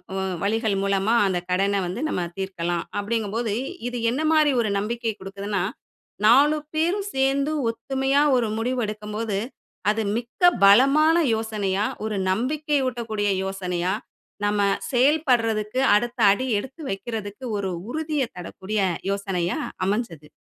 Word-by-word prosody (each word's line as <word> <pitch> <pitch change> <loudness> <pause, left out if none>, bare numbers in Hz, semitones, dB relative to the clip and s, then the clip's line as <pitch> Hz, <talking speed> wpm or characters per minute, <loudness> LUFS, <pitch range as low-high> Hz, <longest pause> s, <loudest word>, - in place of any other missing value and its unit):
உ - - -2 0.3
வழிகள் 220 0 +1
மூலமா 195 +2 +1
அந்த 185 -2 0
கடன 195 +2 +1
வந்து 190 +8 -4
நம்ப 180 - -1 0.2
தீர்க்கலாம். 175 -3 -2
அப்படிங்கும்போது 220 +1 -1 0.3
இது 245 - -4
என்ன 270 +6 -2
மாரி 305 -2 +4
ஒரு 220 - -1
நம்பிக்கை 230 +2 -2
கொடுக்குதுன்னா, 195 0 -3 0.6
நாலு 285 +7 +6 0.2
பேரும் 360 +6 0
சேர்ந்து 275 +2 +1 0.2
ஒத்துமையா 270 +3 0 0.2
ஒரு 235 - +1
முடிவு 250 +3 -1
எடுக்கும்போது, 210 0 -4 0.5
அது 220 +1 -1 0.2
மிக்க 240 +8 -7 0.2
பலமான 275 +10 +6 0.2
யோசனையா, 210 -3 -1 0.2
ஒரு 215 -2 -2
நம்பிக்கை 290 - 0
ஊட்டக்கூடிய 220 -4 -2
யோசனையா, 185 -1 -2 0.5
நம்ம 205 0 +1 0.3
செயல்படுறதுக்கு 245 -5 +2 0.2
அடுத்த 240 +3 -1
அடி 255 +6 0
எடுத்து 265 +8 -9
வைக்குறதுக்கு 205 +3 -5
ஒரு 195 -2 -2 0.2
உறுதிய 305 0 -1
தரக்கூடிய 190 +4 -4 0.3
யோசனையா 190 -3 -1 0.3
அமைஞ்சது. 185 -8 -3
220 Hz, 120 wpm, -24 LUFS, 200-260 Hz, 0.6 s, நாலு